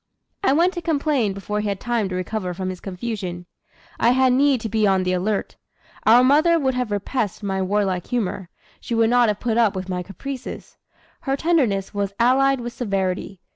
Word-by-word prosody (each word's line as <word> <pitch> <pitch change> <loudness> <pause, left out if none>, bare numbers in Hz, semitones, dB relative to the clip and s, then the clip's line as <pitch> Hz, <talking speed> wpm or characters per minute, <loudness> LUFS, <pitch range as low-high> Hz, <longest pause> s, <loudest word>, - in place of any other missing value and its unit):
"I 390 - +4
went 340 +6 +3
to 345 - -4
complain 290 - 0
before 200 +2 -4
he 210 - -2
had 200 -1 -3
time 235 -5 -1
to 185 - -4
recover 185 0 -3
from 185 +1 -3
his 185 - -8
confusion. 185 -3 -5 0.5
I 235 +2 +4
had 260 0 +3
need 275 0 +3
to 225 - -3
be 215 -1 +1
on 190 -1 +2
the 185 0 0
alert. 195 +3 -2 0.5
Our 240 +3 +7
mother 310 +6 +4
would 265 -4 0
have 250 -2 -2
repressed 205 +1 -2
my 190 -1 -1
warlike 190 -2 0
humor, 195 -6 -2 0.3
she 235 - -4
would 225 0 +3
not 245 -1 +4
have 210 -2 -1
put 235 -1 0
up 220 -5 +3
with 190 0 -5
my 180 -1 -2
caprices. 250 +9 -8 0.4
Her 270 0 -2
tenderness 265 - +1
was 200 -1 -2
allied 265 +2 +3
with 240 0 -6
severity. 195 -4 -2
220 Hz, 195 wpm, -22 LUFS, 190-255 Hz, 0.5 s, Our